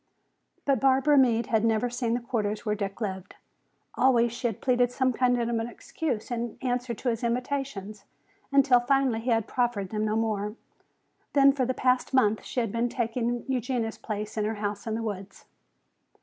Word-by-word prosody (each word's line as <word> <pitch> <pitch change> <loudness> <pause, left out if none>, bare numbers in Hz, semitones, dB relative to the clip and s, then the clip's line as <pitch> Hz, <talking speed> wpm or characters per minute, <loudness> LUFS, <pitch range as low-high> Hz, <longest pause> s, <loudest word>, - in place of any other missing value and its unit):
But 275 -3 +2
Barbara 270 +3 +4
Meade 235 -4 +4
had 220 0 +1
never 225 +1 +2
seen 240 -1 -1
the - - 0
quarters 215 -2 -2
where 210 - +1
Dick 200 -1 -4
lived. 190 -3 -4 0.6
Always 240 -3 +3
she 240 +1 -2
had 225 - -4
pleaded 245 -1 +2
some 255 0 +1
kind 245 0 +2
of 235 - 0
an 230 -1 -1
excuse 245 -1 -4
in 235 -1 -3
answer 245 -1 -2
to 250 - -2
his 230 0 -2
invitations, 235 -5 -3 0.5
until 270 -3 +5
finally 255 -2 +2
he 235 +3 -3
had 225 -2 +2
proffered 240 -6 -1
them 215 0 -1
no 215 0 0
more. 215 -2 -1 0.8
Then 275 -1 +6
for 265 -2 0
the 260 - -1
past 255 +1 +1
month 220 -4 +3
she 250 - -2
had 225 -4 -2
been 235 +2 0
taking 235 0 -2
Eugenia's 245 -3 -2
place 215 0 -5
in 210 - +1
her 220 +1 -1
house 205 0 -4
in 220 - -1
the 225 - -3
woods. 200 -2 -6
235 Hz, 185 wpm, -27 LUFS, 215-255 Hz, 0.8 s, Then